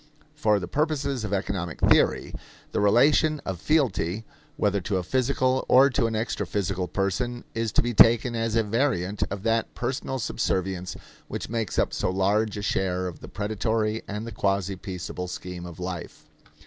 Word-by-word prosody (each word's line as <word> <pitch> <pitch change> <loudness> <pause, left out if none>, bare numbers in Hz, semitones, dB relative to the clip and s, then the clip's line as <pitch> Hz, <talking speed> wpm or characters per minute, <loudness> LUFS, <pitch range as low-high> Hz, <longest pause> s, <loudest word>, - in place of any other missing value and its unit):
For 110 -9 +2
the 90 - -5
purposes 145 - -1
of 105 - -4
economic 95 -4 -2
theory, - - +3 0.4
the - - 0
relation 145 +9 +4
of 95 -3 -4
fealty, 110 - +1 0.3
whether 100 -1 +1
to 95 +2 -1
a 90 - -1
physical 130 +3 +1
or 135 +2 +7
to 115 - +2
an 115 - -3
extraphysical 100 -5 -2
person, 120 +5 -1
is 115 -1 -1
to - - +3
be 120 0 -1
taken 115 +2 +6
as 115 -1 -1
a 115 - +3
variant 105 -4 0
of 100 0 -5
that 115 0 0
personal 130 +2 -2
subservience 95 -5 -2 0.3
which - - -5
makes 115 -3 -2
up - - +1
so - - 0
large 100 +3 +1
a 100 - -4
share 95 -2 0
of 90 -2 -6
the - - -10
predatory 110 +2 -1
and 105 +2 -4
the 115 - -6
quasi 100 -2 0
peaceable 90 -1 -5
scheme 90 0 -6
of 85 -1 -10
life. 90 -1 -6
105 Hz, 170 wpm, -26 LUFS, 95-120 Hz, 0.4 s, or